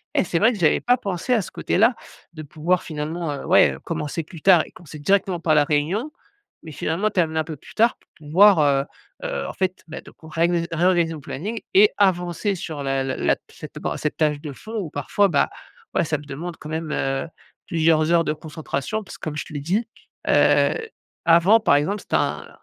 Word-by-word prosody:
Eh! - - +3
c'est 170 -1 0
vrai 225 +6 +5
que 215 - -6
j'avais 160 -4 +3
pas 245 +1 +3
pensé 200 0 -4
à 230 - +3
ce 185 - -8
côté - - -2
là, 230 +5 +4 0.4
de 155 -1 -8
pouvoir 155 +5 -1
finalement, 155 +1 -4
heu, 140 - -7
ouais, 180 +4 +5
heu, - - -12
commencer 165 -1 -4
plus 160 0 -12
tard 180 -3 +6
et - - -16
commencer 155 -3 -12
directement 190 +2 +1
par 160 -2 +2
la 150 - +5
réunion, 160 - -1 0.5
mais 160 - -8
finalement, 165 +8 -1
terminer 160 -5 0
un - - +1
peu 155 -1 -7
plus - - -15
tard 230 +2 +3
pour - - -32 0.2
pouvoir, 190 +4 +6
heu 140 -2 +3 0.4
heu, - - -3
en - - -6
fait 185 0 -2
bah, 160 - -7
de - - -15
qu'on 160 - -16
réganis 170 +2 +1
réorganiser 170 0 +2
mon 155 - -7
planning 205 - -5
et 205 +2 +6
avancer 185 +1 +1
sur 160 -5 -6
la 135 -1 0
la 130 0 -2
la - - +2
cette - - -11
bon, - - -2
cette 150 - -2
tâche 150 -2 +1
de 150 - -6
fond 220 - -8
où 180 -6 -4
parfois 200 +8 +1
bah, 145 -5 +2 0.4
ouais, - - +2
ça 155 0 -1
me 145 - -11
demande 165 +5 -6
quand 150 - -10
même, 160 0 -4
heu, 135 +2 -1 0.4
plusieurs 160 -1 +2
heures 170 -1 +4
de 150 - -1
concentration 155 +5 -4
parce - - -11
que, - - -31
comme 155 -1 -4
je - - -4
te - - -12
l'ai 145 - -3
dit: 190 +10 0 0.4
«Heu, - - +4 0.5
avant, 170 +6 +6
par 175 -10 +3
exemple, 160 +9 0
c'était - - -3
un» - - -1
165 Hz, 225 wpm, -22 LUFS, 150-190 Hz, 0.5 s, tard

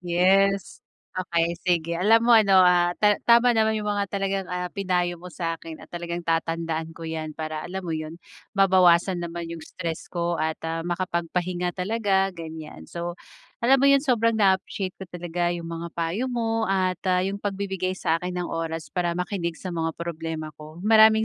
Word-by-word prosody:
Yes. 190 +3 +2 0.4
Okey 170 -2 0
sige. 170 -2 +1
Alam 225 +6 +4
mo - - +7
ano, 200 -4 +6
ah, 175 -1 +5
ta 210 -1 +5
tama 235 +1 +6
naman 220 0 +3
yung 210 -1 -3
mga 205 -1 +1
talagang, 195 -1 -1
ah, 180 0 -2
pinayo 180 -2 -1
mo 180 +2 -10
sa'kin 165 -2 -5
at - - -13
talagang 170 0 -4
tatandaan 165 -1 -1
ko 165 0 -10
'yan 160 -1 -4
para 155 -1 -4
alam 190 +2 -4
mo 165 - -3
yun, 155 +2 -7 0.3
mabawasan 185 -2 +4
naman 170 0 -5
yung 165 -1 -7
stress 165 -3 -5
ko 170 -1 -1
at 160 0 -1
ah, 165 0 -2
makapagpahinga 175 0 -2
talaga, 195 0 +1
ganyan. 160 - -8
So 170 0 -5 0.5
alam 265 +2 +5
mo 275 - +5
yun 275 0 +5
sobrang 230 -4 +2
na-appreciate 190 -1 +1
ko 190 - -7
talaga 175 0 -2
yung 170 - -7
mga 165 +1 -5
payo 170 +10 -1
mo 225 -3 -1
at 185 -1 +1
ah, 180 0 +3
yung 200 +1 -3
pagbibigay 190 -2 -2
sa'kin 180 +2 -1
ng 180 -1 -2
oras 165 -1 -4
para 175 -2 0
makinig 180 -2 -2
sa 185 - -6
mga 165 -1 -2
problema 160 -2 -5
ko. 155 +1 -11
Maraming 220 0 +6
180 Hz, 175 wpm, -25 LUFS, 165-195 Hz, 0.5 s, mo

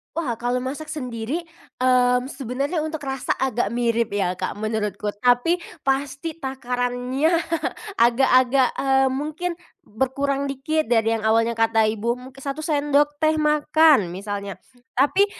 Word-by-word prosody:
Wah, 255 -9 -2
kalau 245 +1 -1
masak 305 +4 -5
sendiri 250 +2 -4 0.4
mmm 250 0 +3
sebenarnya 275 +5 -2
untuk 315 -1 -5
rasa 270 -2 -2
agak 240 -4 -1
mirip 235 -2 0
ya 185 -3 0
Kak - - -3
menurutku, 215 -1 -2
tapi 245 +9 +3 0.2
pasti 275 +4 -2
takarannya 255 +2 -1 0.6
agak-agak 255 +1 +4
eee 270 0 +3
mungkin 310 +6 -3 0.2
berkurang 275 +4 -1
dikit 280 +3 -1
dari 225 -1 +2
yang 220 - -6
awalnya 230 +1 +2
kata 225 -1 +3
ibu 225 +2 -1 0.2
1 275 +2 -5
sendok 295 -1 +1
teh 310 +1 +2
makan 300 - +4
misalnya. 200 +1 -5 0.4
Tapi, 290 +10 +3
260 Hz, 125 wpm, -23 LUFS, 230-290 Hz, 0.6 s, agak-agak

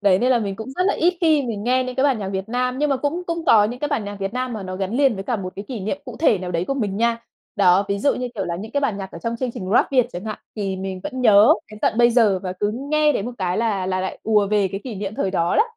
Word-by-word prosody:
Đấy, 195 -2 +4
nên 250 +3 +2
là 245 - +4
mình 200 -3 -3
cũng 220 +3 -7
rất 365 - +2
là - - +2
ít 350 +2 +2
khi 315 -4 +4
mình 220 -4 -4
nghe 255 +1 +2
những 255 - -5
cái 265 - +2
bản 270 -6 +2
nhạc 195 -2 -4
Việt 190 +2 -4
Nam, 250 +2 -1
nhưng 295 -1 +1
mà 270 - +2
cũng 295 +7 -2
cũng 335 -1 -3
có 215 -10 +6
những 240 +4 -4
cái 295 - -1
bản 215 - -1
nhạc 205 0 -6
Việt 195 +1 -2
Nam 255 0 -2
mà 215 -3 -5
nó 185 0 -5
gắn 190 0 -3
liền 275 -4 +3
với 195 -1 -6
cả 240 0 -1
một 185 -2 -6
cái 200 - -6
kỷ 240 -6 -5
niệm 220 +9 -3
cụ 250 -3 -8
thể 285 - +3
nào 180 -1 -5
đấy 170 +1 0
của 275 - -2
mình 205 -7 -2
nha. 230 +1 +1 0.4
Đó, 190 0 +4
ví 200 0 0
dụ 280 - +2
như 250 0 -3
kiểu 195 - -2
là 170 0 -3
những 215 +5 -8
cái 285 - +1
bản 225 -8 -1
nhạc 190 -1 -6
ở 170 - -8
trong 230 +5 -3
chương 255 0 -2
trình 185 0 -6
Rap - - +3
Việt 250 -2 +4
chẳng 180 +4 -6
hạn, 215 -1 -5 0.2
thì 195 -2 -2
mình 190 0 -5
vẫn 260 -3 -5
nhớ 215 -3 +7 0.2
đến 215 - -10
tận 225 - +1
bây 240 0 +6
giờ, 220 -5 +3
và 185 -1 -3
cứ 205 +3 -1 0.2
nghe 305 -1 +4
đến 200 - -2
một 245 - -5
cái 180 -2 -1
là 205 -5 0
là 185 0 -1
lại 190 - -4
ùa 210 -2 +3
về 205 -2 +2
cái 195 +2 -5
kỷ 245 - -5
niệm 200 +1 -5
thời 195 -3 -1
đó 170 -2 +1
đó. - - +6
215 Hz, 335 wpm, -22 LUFS, 195-255 Hz, 0.4 s, nhớ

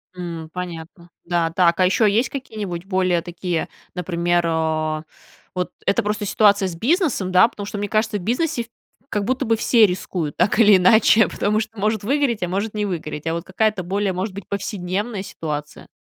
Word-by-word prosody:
М, 170 -3 -6
понятно. 175 -1 -7 0.2
Да, 170 -1 +1
так, 170 0 +3
а 185 - +5
еще 210 +4 +3
есть 230 +5 +1
какие-нибудь 210 -10 -5
более 185 -3 +1
такие, 175 -1 -3 0.3
например, 175 -1 0
о, 155 -1 -1 0.5
вот 180 0 -2
это - - +2
просто 210 +1 -2
ситуация 205 -1 +3
с 175 - -6
бизнесом, 255 - +1
да, 185 +4 +6
потому 205 -3 -8
что, 210 +1 -6
мне 205 0 -3
кажется, 215 0 +1
в - - -7
бизнесе, 240 - -1 0.4
как 210 - -1
будто 260 +3 -1
бы, 225 -1 +2
все 225 0 +4
рискуют, 180 -5 -3
так 205 - +2
или 210 -3 +7
иначе, 215 +3 +5
потому 210 +1 0
что 220 0 -5
может 215 +1 0
выгореть, 250 -3 0
а - - 0
может 200 +4 -2
не 210 -1 0
выгореть, 160 -5 -5
а, 165 - 0
вот, 170 0 -3
какая-то 200 +1 0
более, 195 +2 -1
может 185 +3 -3
быть, 200 - -8
повседневная 200 +1 -3
ситуация. 150 -5 -6
195 Hz, 185 wpm, -21 LUFS, 175-215 Hz, 0.5 s, или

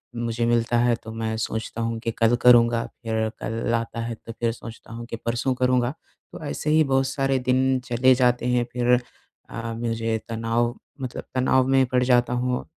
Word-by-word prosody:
मुझे 115 0 -1
मिलता 120 0 +2
है 120 0 +3
तो 110 - -8
मैं 110 0 -3
सोचता 110 +1 -3
हूँ 115 0 -2
कि 115 0 -2
कल 115 +1 +4
करूँगा। 120 -1 +5 0.2
फिर 110 -1 -1
कल 115 +1 -2
आता 115 0 -3
है 115 0 -4
तो 115 - -11
फिर 115 -1 +1
सोचता 115 0 -11
हूँ 115 0 -7
कि 115 - -6
परसों 120 +3 0
करूँगा। 125 -1 +2 0.4
तो - - -9
ऐसे 70 - -3
ही 155 +1 +5
बहुत 135 -1 +1
सारे 135 0 0
दिन 130 +1 +2
चले 125 +1 +4
जाते 125 -1 +2
हैं 125 -1 +2
फिर 125 0 +2 0.6
अ, 115 0 -5
मुझे 115 -1 -1
तनाव 115 +1 0 0.3
मतलब 130 -1 -5
तनाव 130 0 +3
में 135 0 +4
पड़ 125 0 +1
जाता 125 -1 +3
हूँ। 125 0 -1
120 Hz, 190 wpm, -24 LUFS, 115-125 Hz, 0.6 s, करूँगा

